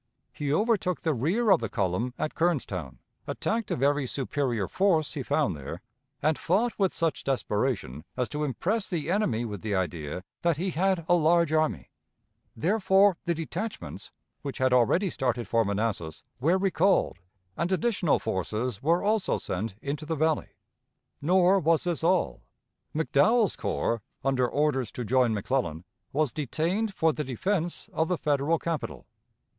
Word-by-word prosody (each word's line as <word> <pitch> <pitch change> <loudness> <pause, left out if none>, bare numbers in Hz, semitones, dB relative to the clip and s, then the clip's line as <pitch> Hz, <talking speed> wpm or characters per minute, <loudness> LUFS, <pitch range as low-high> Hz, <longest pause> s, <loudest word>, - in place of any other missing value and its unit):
He 145 -2 -2
overtook 200 0 +1
the 160 -3 +1
rear 185 - +1
of 185 - +6
the - - -3
column 115 +8 -1
at 155 - -2
Kernstown, 105 - -1 0.3
attacked 225 -1 -2
a - - 0
very 140 +1 +1
superior 125 -6 -1
force 175 -6 +2
he 145 - -3
found 130 - +1
there, 70 -1 -7 0.4
and 155 -1 +2
fought 215 +7 +1
with 195 -2 +3
such 165 -2 -1
desperation 105 - -1
as 125 -1 0
to 150 0 -2
impress 190 - -1
the 165 -3 -2
enemy 120 - +1
with 105 -5 -6
the 105 -2 -1
idea 85 -2 -3 0.2
that 170 -3 +2
he 185 +3 -1
had 185 0 +1
a - - +4
large 170 -1 +3
army; 155 - 0 0.6
therefore, 190 - +3
the 170 - +1
detachments, 165 - -5 0.3
which 140 -2 -5
had 130 -1 +2
already 165 - +3
started 125 -2 -1
for 115 -1 +3
Manassas, 100 -6 -2 0.2
were 165 +8 +3
recalled, 190 - +2 0.4
and 170 +4 -1
additional 190 -5 +2
forces 110 +2 -2
were 170 +5 +2
also 210 -1 +1
sent 95 +2 -4
into 145 +2 -4
the 165 - -1
Valley. 155 +1 +1 0.7
Nor 185 +4 +4
was 165 -1 +2
this 175 -2 -2
all. 180 +1 +1 0.5
McDowell's 200 - +3
corps, 115 -1 -1 0.2
under 130 -2 +2
orders 140 -5 0
to 125 - -4
join 125 +1 +3
McClellan, 100 - -1 0.3
was 150 -2 +1
detained 170 - -1
for 160 -1 +3
the 150 - -3
defense 170 - -2
of 160 - +1
the 180 - 0
Federal 150 +2 +1
capital. 150 - -4
150 Hz, 155 wpm, -28 LUFS, 120-180 Hz, 0.7 s, of